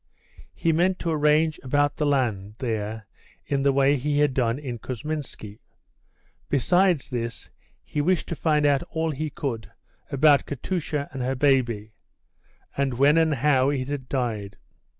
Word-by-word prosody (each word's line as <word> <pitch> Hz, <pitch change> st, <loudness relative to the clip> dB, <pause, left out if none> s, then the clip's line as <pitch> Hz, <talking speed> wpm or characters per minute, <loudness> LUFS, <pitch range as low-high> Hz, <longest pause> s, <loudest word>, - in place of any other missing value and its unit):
He 165 Hz, -, +1 dB
meant 180 Hz, +3 st, +2 dB
to 170 Hz, -, -2 dB
arrange 155 Hz, +1 st, +2 dB
about 145 Hz, +2 st, +1 dB
the 150 Hz, -, +1 dB
land 110 Hz, -8 st, 0 dB
there 110 Hz, -3 st, -3 dB, 0.4 s
in 140 Hz, -1 st, 0 dB
the 140 Hz, 0 st, +3 dB
way 135 Hz, +1 st, +3 dB
he 145 Hz, +3 st, -1 dB
had 145 Hz, -2 st, +3 dB
done 120 Hz, -2 st, +1 dB
in 130 Hz, -5 st, -6 dB
Kousminski. 130 Hz, -5 st, -6 dB, 0.9 s
Besides 175 Hz, +3 st, +2 dB
this, 115 Hz, -1 st, -5 dB, 0.3 s
he 150 Hz, -, -2 dB
wished 180 Hz, +3 st, +1 dB
to 170 Hz, -, -2 dB
find 150 Hz, -2 st, +1 dB
out 145 Hz, 0 st, +3 dB
all 160 Hz, 0 st, -1 dB
he 155 Hz, +2 st, -3 dB
could 125 Hz, -8 st, -4 dB, 0.4 s
about 140 Hz, +1 st, +4 dB
Katusha 150 Hz, 0 st, -3 dB
and 135 Hz, -, -4 dB
her 130 Hz, +2 st, -1 dB
baby, 120 Hz, -6 st, +1 dB, 0.8 s
and 135 Hz, -2 st, 0 dB
when 140 Hz, +4 st, +4 dB
and 160 Hz, -1 st, +3 dB
how 135 Hz, 0 st, +3 dB
it 135 Hz, -2 st, -2 dB
had 140 Hz, -3 st, -5 dB
died. 110 Hz, -7 st, -2 dB
140 Hz, 150 wpm, -25 LUFS, 125-150 Hz, 0.9 s, about